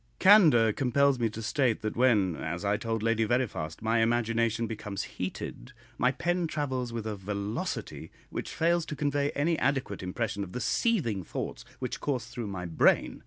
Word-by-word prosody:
Candour 155 - +6
compels 135 +1 +2
me 115 -1 +1
to 110 +1 -7
state 120 -2 +1
that 110 - -2
when, 110 -8 +3
as 85 +5 -4
I 100 +1 +2
told 110 0 -2
Lady 115 0 +2
Veriphast, 110 -8 -1
my 115 +1 +2
imagination 115 0 +1
becomes 105 -3 -4
heated, 90 -9 -6 0.3
my 125 +1 +4
pen 175 +4 -1
travels 130 -6 -2
with 115 -2 -4
a 110 -1 -3
velocity 100 +2 -4 0.2
which - - -4
fails 170 +1 +1
to 150 - -4
convey 145 0 0
any 160 +3 +1
adequate 130 -8 0
impression 100 +2 -2
of 90 - -9
the - - -3
seething 125 - +1
thoughts - - -5
which - - -4
course 135 -4 -2
through 120 -3 -6
my 95 -3 -5
brain. 85 -2 +2
115 Hz, 170 wpm, -29 LUFS, 105-140 Hz, 0.3 s, Candour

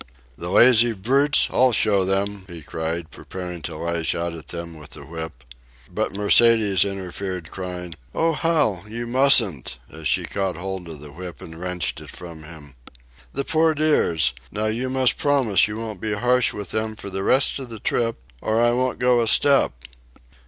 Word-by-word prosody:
"The 85 +6 -6
lazy 120 +3 +6
brutes, 135 +8 +3
I'll 130 0 +4
show 100 -4 +3
them," 100 +1 -2
he 85 -4 -10
cried, 80 +2 -4
preparing 90 -2 -7
to 75 - -6
lash 85 0 -1
out 85 0 -3
at 80 -2 -9
them 85 -1 -7
with 75 - -10
the - - -11
whip. 80 -5 -8 0.5
But - - -1
Mercedes 105 -1 +5
interfered, 95 -3 -5
crying, 90 -2 -6 0.2
"Oh, 165 0 +2
Hal, 150 - +1
you 115 +2 -5
mustn't," 120 - +3
as 80 -1 -5
she - - +1
caught 95 -4 -3
hold 95 -1 -6
of 75 -3 -9
the 75 -1 -11
whip 90 +3 -9
and 80 - -10
wrenched 90 -2 -3
it - - -12
from 85 -3 -10
him. 75 -3 -12 0.6
"The 140 - -3
poor 160 0 +2
dears! 85 - +2 0.2
Now 105 +1 -2
you 115 +4 -1
must 130 -1 +2
promise 130 -11 +2
you 105 0 -6
won't 110 -4 -6
be 110 -1 -1
harsh 125 +3 +2
with 105 -1 -6
them 110 0 -2
for 100 -2 -8
the 95 +1 -3
rest 135 +4 +3
of 130 -2 -7
the 115 -2 -8
trip, 115 +2 0 0.3
or 110 +1 0
I 120 0 +4
won't 130 +1 0
go 125 -1 +3
a 115 - 0
step." 140 +4 +4
100 Hz, 180 wpm, -22 LUFS, 85-120 Hz, 0.6 s, lazy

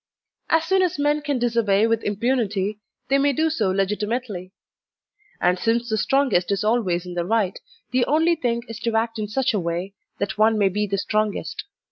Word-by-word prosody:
As 325 0 +3
soon 380 +2 +3
as 360 -4 0
men 295 +1 +1
can 285 -2 -1
disobey 230 -4 +2
with 230 0 0
impunity, 210 -2 -1 0.3
they 275 +1 +4
may 285 0 +3
do 320 +4 +1
so 220 -11 0
legitimately; 205 0 -2 0.9
and 180 +1 +2
since 235 +2 0
the 220 - +1
strongest 250 -6 +2
is 200 +1 0
always 205 -6 +1
in 180 - -7
the 175 -1 -1
right, 200 0 0 0.3
the 250 -1 +2
only 320 +3 +3
thing 235 -6 -1
is 225 -1 -7
to 230 0 -2
act 225 0 0
in 210 - -2
such 260 +4 0
a 210 - +1
way 175 +3 -3 0.2
that 200 +1 -3
one 220 0 +4
may 200 -2 +3
be 210 +2 -1
the 200 0 -1
strongest. 215 - -2
220 Hz, 190 wpm, -23 LUFS, 195-255 Hz, 0.9 s, they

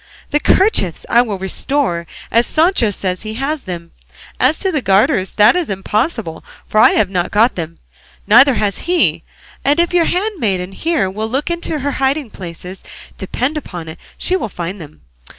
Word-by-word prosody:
The 295 - +2
kerchiefs 300 - +2
I 240 - +5
will 215 -5 -3
restore, 190 - -1 0.2
as 235 +1 +3
Sancho 315 - +2
says 185 -2 -3
he 215 0 -6
has 275 +4 -3
them; 170 -3 -7 0.5
as 265 +5 +3
to 385 - 0
the 300 -5 -1
garters 195 -2 +2
that 210 +6 +5
is 355 -4 -1
impossible, 205 - -2 0.2
for 215 - +1
I - - +7
have 200 -3 +1
not 175 -2 -1
got 225 +4 +3
them, 165 -1 -6 0.5
neither 250 +5 +6
has 205 -3 -1
he; 355 -1 +2 0.4
and 290 +4 +2
if 345 +1 +1
your 345 -2 +4
handmaiden 240 - -1
here 315 - 0
will 215 +4 -4
look 275 +7 -2
in 340 0 -3
her 285 -2 -1
hiding 270 -2 -1
places, 180 +1 -9 0.4
depend 255 +10 -2
upon 175 - -8
it 160 - -10 0.2
she 370 - 0
will 370 - -2
find 180 +1 -6
them. 145 - -13
220 Hz, 175 wpm, -17 LUFS, 185-295 Hz, 0.5 s, I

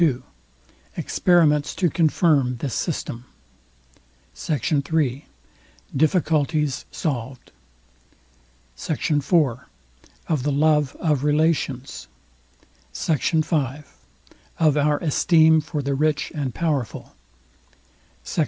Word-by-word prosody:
II 140 -7 +2 0.7
EXPERIMENTS 155 -5 +2
TO 180 - +1
CONFIRM 155 -6 +2
THIS 130 +1 -4
SYSTEM 125 -7 -3 1.1
SECT. 145 - -2
III 145 -4 0 0.7
DIFFICULTIES 150 -2 +1
SOLVED 130 -4 -5 1.2
SECT. 155 - -3
IV 145 -2 -1 1.0
OF 155 -5 0
THE 145 +3 -1
LOVE 150 -1 +2
OF 150 -5 0
RELATIONS 150 -3 0 0.8
SECT. 155 -5 -1
V 150 -3 -1 0.7
OF 155 -3 +3
OUR 150 0 +2
ESTEEM 160 0 +4
FOR 150 -1 -4
THE 140 +1 -1
RICH 150 +1 0
AND 140 -6 -4
POWERFUL 150 -8 -3 1.1
SECT. - - -5
150 Hz, 90 wpm, -22 LUFS, 140-160 Hz, 1.2 s, ESTEEM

